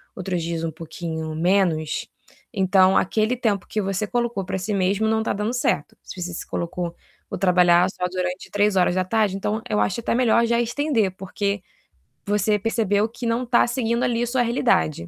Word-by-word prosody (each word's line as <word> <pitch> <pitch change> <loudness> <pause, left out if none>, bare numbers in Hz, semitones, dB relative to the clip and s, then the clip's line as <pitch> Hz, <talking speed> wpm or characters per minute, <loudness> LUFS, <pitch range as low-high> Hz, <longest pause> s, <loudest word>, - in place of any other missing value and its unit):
outros 180 -1 -3
dias 165 0 -3
um 165 - -2
pouquinho 160 0 -6
menos, 170 -3 +1 0.5
então 190 -1 +4
aquele 215 +5 +1
tempo 215 -6 -1
que 215 - -2
você 195 +1 -2
colocou 240 -3 -1
para 190 - -3
si 195 +3 -3
mesmo 195 +3 +1
não 220 0 +2
está 220 - -1
dando 210 +4 -2
certo. 150 -11 -1
Se - - -10
você 175 0 -4
se - - -6
colocou: 170 0 -4 0.3
"Vou - - -4
trabalhar 180 -1 +4
só 180 - -3
durante 180 0 -4
15h", 195 0 +2
então 210 +3 -2
eu 210 -1 +1
acho 195 - 0
até 235 - -1
melhor 235 -1 +3
já 235 0 +1
estender, 240 -3 0
porque 200 +1 -2 0.6
você 210 +1 +2
percebeu 215 -1 +1
que 235 +2 -8
não 230 +2 0
está 240 -1 +3
seguindo 235 -1 0
ali 235 -1 +1
a - - -1
sua 250 +1 +1
realidade. 235 - +1
200 Hz, 180 wpm, -23 LUFS, 180-230 Hz, 0.6 s, então